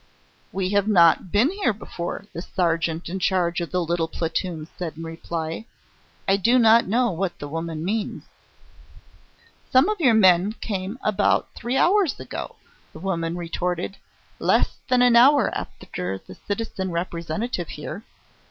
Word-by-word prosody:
"We 190 -1 -1
have 200 0 +2
not 175 -3 +4
been 230 +10 +3
here 390 - 0
before," 195 -1 -6
the 170 - -5
sergeant 170 -2 -1
in 185 +3 -4
charge 180 -2 +1
of 170 - -4
the 180 -1 0
little 170 0 0
platoon 165 -1 -3
said 165 -3 -5
in 165 - -6
reply. 165 +4 -5 0.6
"I 195 - +4
do 235 +6 +3
not 230 -2 +6
know 235 +3 +2
what 180 +1 -2
the 145 - -6
woman 165 +1 -4
means." 210 +2 -2 1.5
"Some 260 +4 +5
of 425 -2 -1
your 255 -9 +4
men 190 -1 +5
came 200 -1 -4
about 210 -1 +1
three 245 +3 -2
hours 380 -2 +3
ago," - - -6 0.4
the - - -10
woman 170 -2 -2
retorted; 175 +2 -3 0.4
"less - - +2
than 250 -1 +4
an 245 -1 +5
hour 270 +3 +6
after 95 +2 -5
the 95 - -13
citizen 205 - -4
Representative 170 +3 -3
was - - -8
here. 155 +6 -7
185 Hz, 150 wpm, -24 LUFS, 170-220 Hz, 1.5 s, not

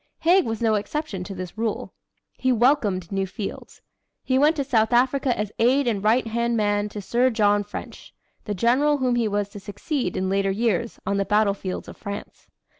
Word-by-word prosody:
Haig 350 +2 +4
was 225 +1 -3
no 220 -1 +3
exception 210 - -3
to 195 - -7
this 185 +3 -7
rule. 225 -2 -2 0.4
He 260 - 0
welcomed 225 - +2
new 195 -1 -1
fields. 195 +2 -7 0.4
He 260 0 +1
went 300 +3 +4
to 285 - -1
South 235 -4 +1
Africa 260 +1 +2
as 210 -1 -2
aide 260 +5 +3
and 205 -4 0
right 230 +4 +3
hand 235 +1 0
man 205 -1 +1
to 205 -1 -7
Sir 245 +5 +2
John 205 -3 +2
French 205 - -9 0.3
the 210 - -3
general 265 +9 +3
whom 255 -2 +1
he 235 -2 +1
was 205 -1 -1
to 205 0 -9
succeed 205 - -3
in 185 - -1
later 195 +1 +1
years 225 +2 -1
on 200 - 0
the 200 - +2
battlefields 200 -2 0
of - - -10
France. 200 0 -8
220 Hz, 190 wpm, -24 LUFS, 200-250 Hz, 0.4 s, Haig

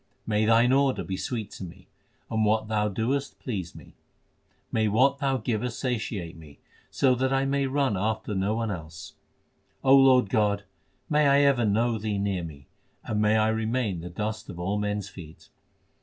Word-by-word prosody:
May 110 0 +1
Thine 115 +2 +4
order 135 -7 +2
be 95 +2 -4
sweet 110 0 -4
to - - -8
me, 85 - -11 0.4
and 110 0 +1
what 110 0 +1
Thou 105 -1 +1
doest 125 +7 -2
please 95 -9 -5
me! - - -14 0.8
May 110 -1 +1
what 130 +6 +3
Thou 135 -2 +1
givest 120 0 -3
satiate 105 -9 -3
me, 75 -3 -14 0.3
so 130 -2 +2
that 130 +1 0
I 135 0 +2
may 140 0 0
run 135 -4 +1
after 110 +2 -2
no 100 +2 0
one 115 -1 -2
else! 80 -3 -8 0.7
O 135 +1 +6
Lord 130 -4 +6
God, 105 -2 +1 0.4
may 150 -1 +3
I 140 +1 +5
ever 135 -5 +3
know 110 +2 +1
Thee 105 -1 -2
near 100 -3 -1
me, 70 -4 -9 0.4
and 105 -1 -1
may 105 +1 +3
I 110 0 +3
remain 110 -3 -1
the 90 - -7
dust 110 +5 -4
of 85 - -8
all 95 +4 -1
men 105 0 -1
s 100 -2 -5
feet 80 -4 -13
110 Hz, 185 wpm, -26 LUFS, 100-125 Hz, 0.8 s, O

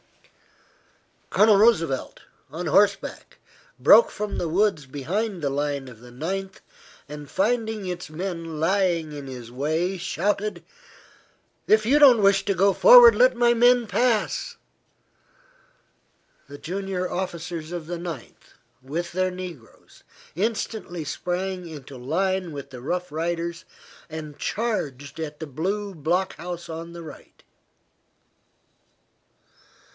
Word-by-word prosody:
Colonel 210 -1 +5
Roosevelt, 165 - +2 0.3
on 165 +5 -5
horseback, 200 +5 +1 0.4
broke 475 - +7
from 210 0 -4
the 170 - -2
woods 185 -4 +1
behind 180 - -3
the 140 - 0
line 140 -1 -2
of 120 -4 -12
the 125 - -13
Ninth, 190 +9 -4 0.5
and 150 -1 -9
finding 220 +2 0
its 180 -2 -5
men 165 -1 -5
lying 170 -3 +1
in 145 -2 -7
his 125 -3 -8
way, 160 +8 -1
shouted: 195 +1 -2 1.0
"If 215 0 +4
you 280 +6 +4
don't 255 -7 +7
wish 195 0 +4
to 200 - 0
go 195 +1 +4
forward, - - +9
let - - +5
my 240 0 +4
men 245 0 +4
pass." 240 - 0 1.9
The 145 - -9
junior 185 +2 -3
officers 170 -3 -5
of 175 -3 -5
the 175 0 -4
Ninth, 170 -8 -9 0.3
with 165 +6 -4
their 185 +1 0
negroes, 175 - -11 0.3
instantly 205 -3 -3
sprang 180 +3 -3
into 145 -4 -10
line 180 +7 -1
with 140 -2 -8
the 125 -2 -9
Rough 180 +7 -3
Riders, 170 +2 -3 0.5
and 155 -2 -7
charged 145 - -3
at 150 -2 -5
the 160 - -6
blue 195 +8 -3
block 175 +5 -1
house 175 0 -7
on 165 +1 -7
the 170 0 -9
right. 155 - -13
175 Hz, 120 wpm, -24 LUFS, 155-200 Hz, 1.9 s, forward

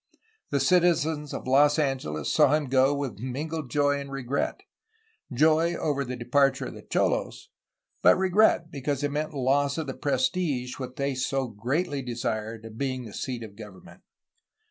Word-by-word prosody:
The 140 - +1
citizens 160 -1 +2
of - - -6
Los 145 +3 +4
Angeles 130 - -1
saw - - +6
hun 150 +1 +1
go 130 +1 +3
with 135 -8 -4
mingled 145 +4 -4
joy 145 +2 +2
and 140 0 -7
regret, 135 0 -2 0.4
— 445 - -37
^joy 160 +5 +3
over 140 -2 -1
the 125 -1 -5
de 120 -1 -8
parture 135 +2 +2
of - - -10
the - - -10
cholosy - - -1 0.5
but - - +6
regret 190 -2 +3
because 140 0 -2
it 145 - 0
meant 150 +1 -3
loss 140 +2 +1
of 160 - -2
the 135 - -4
prestige, 145 - -1
which 130 -1 -6
they 140 0 -1
so 135 0 -1
greatly 135 - -2
desired, 115 -2 -4
of 110 0 -10
being 130 -2 -2
the 105 - -10
seat 125 -3 -4
of 105 -2 -10
government. 105 -4 -13
140 Hz, 170 wpm, -27 LUFS, 125-150 Hz, 0.5 s, saw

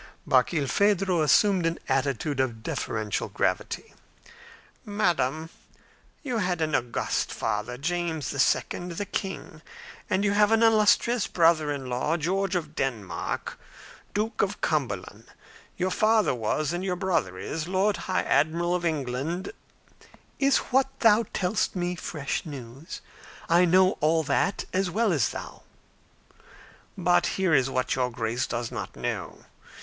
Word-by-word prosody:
Barkilphedro 175 +7 +2
assumed 180 - +4
an 165 - -1
attitude 135 +1 0
of 120 -4 -1
deferential 110 -3 -2
gravity. - - -2 0.9
"Madam, 165 -7 0 0.7
you 250 -5 -1
had 180 -4 0
an 155 -1 -1
august 120 -1 -1
father, 105 +4 -2
James 160 -2 -2
II., 170 +5 0
the 205 - -3
king, 190 -6 -5 0.5
and 190 +2 +1
you 200 - +3
have 210 +1 +4
an 225 0 +4
illustrious 225 +1 +4
brother 165 -3 +3
in 140 -2 -4
law, 125 +6 -1
George 190 +4 -1
of 160 -4 -3
Denmark, 110 -9 -3 0.6
Duke 215 +2 0
of - - -1
Cumberland; - - -2 0.5
your 185 +1 0
father 215 0 +3
was, 135 +7 -1
and 175 +1 -3
your 185 -2 -1
brother 175 - -1
is, 160 - -4
Lord 195 +3 +1
High 185 -1 -1
Admiral 170 +3 +1
of 180 -1 -1
England 155 - -2 0.5
" - - -23 0.3
"Is 275 -1 +4 0.2
what 265 +1 +4
thou 225 0 +5
tellest 190 +3 0
me 180 0 -1
fresh 155 -5 -3
news? 135 -1 -9 0.5
I 175 +2 +5
know 185 +2 +5
all 160 +1 +2
that 155 +7 0
as 190 0 +1
well 215 +2 +1
as 140 -9 +2
thou." - - -8 1.4
"But 90 - +3
here 190 -4 +2
is 135 -2 +4
what 130 -1 0
your 125 -1 0
Grace 115 +1 -2
does 120 -1 -3
not - - -6
know. - - -5
170 Hz, 135 wpm, -26 LUFS, 135-190 Hz, 1.4 s, thou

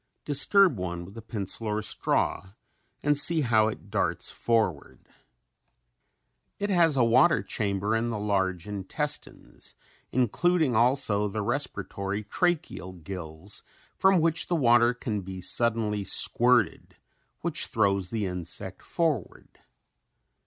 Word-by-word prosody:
Disturb 150 - +4
one 85 -1 -4
with 95 - -13
a 115 - -8
pencil 110 0 -2
or 105 0 -1
straw 95 -2 -1 0.5
and 145 0 +3
see 160 +3 +4
how 110 -5 +3
it 110 - -7
darts - - -1
forward. 110 -10 -2 1.5
It 205 0 -2
has 165 -6 +3
a 125 - +4
water 130 +8 +4
chamber 105 0 -2
in 115 +1 -1
the 115 - -3
large 95 -3 -1
intestines, 100 -2 -5 0.4
including 140 - +1
also 115 -3 +2
the 105 +1 -4
respiratory 100 -5 -3
tracheal 160 - -2
gills, 85 +1 -7 0.3
from 190 -1 +4
which 165 0 +1
the 175 - 0
water 120 -4 +4
can 110 -4 -4
be 95 0 -8
suddenly 110 0 0
squirted 120 +5 +3 0.4
which - - 0
throws 100 -4 0
the 110 -1 -2
insect 90 +1 -4
forward. 165 -4 -3
110 Hz, 120 wpm, -27 LUFS, 100-135 Hz, 1.5 s, Disturb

